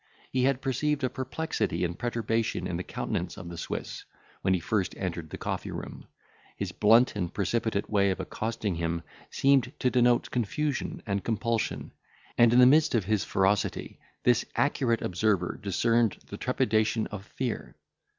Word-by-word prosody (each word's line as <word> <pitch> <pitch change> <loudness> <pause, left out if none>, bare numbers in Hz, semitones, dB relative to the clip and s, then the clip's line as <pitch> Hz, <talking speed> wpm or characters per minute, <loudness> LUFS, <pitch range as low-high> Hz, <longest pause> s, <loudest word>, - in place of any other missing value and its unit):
He 130 -1 +2
had 135 -1 +1
perceived 140 +2 0
a 130 - +1
perplexity 130 - -2
and 85 0 -3
perturbation 115 -2 -1
in - - -2
the - - -3
countenance - - -3
of 85 - -8
the 85 - -7
Swiss, - - -5 0.4
when 95 0 +2
he - - 0
first 95 +3 -1
entered 85 -4 -4
the - - -6
coffee - - -3
room; - - -7 0.5
his - - -3
blunt 115 +4 +4
and 90 -4 -2
precipitate 105 0 -1
way 100 -2 +3
of 95 - -1
accosting 110 -3 -3
him 85 0 -2 0.3
seemed 135 -2 +3
to 125 - +1
denote 120 -1 +3
confusion 130 +5 -2
and 100 -2 -1
compulsion; 115 0 -1 0.4
and, 120 -1 +6
in 120 - +4
the 125 - +9
midst 150 +2 +5
of 110 -5 +1
his 105 0 +1
ferocity, 95 +1 0 0.2
this 120 -2 +4
accurate 125 -5 +1
observer 90 -1 0
discerned 115 +2 +2
the - - -8
trepidation 110 +1 +1
of 105 -2 -6
fear. 120 +2 -4
115 Hz, 160 wpm, -28 LUFS, 100-125 Hz, 0.5 s, the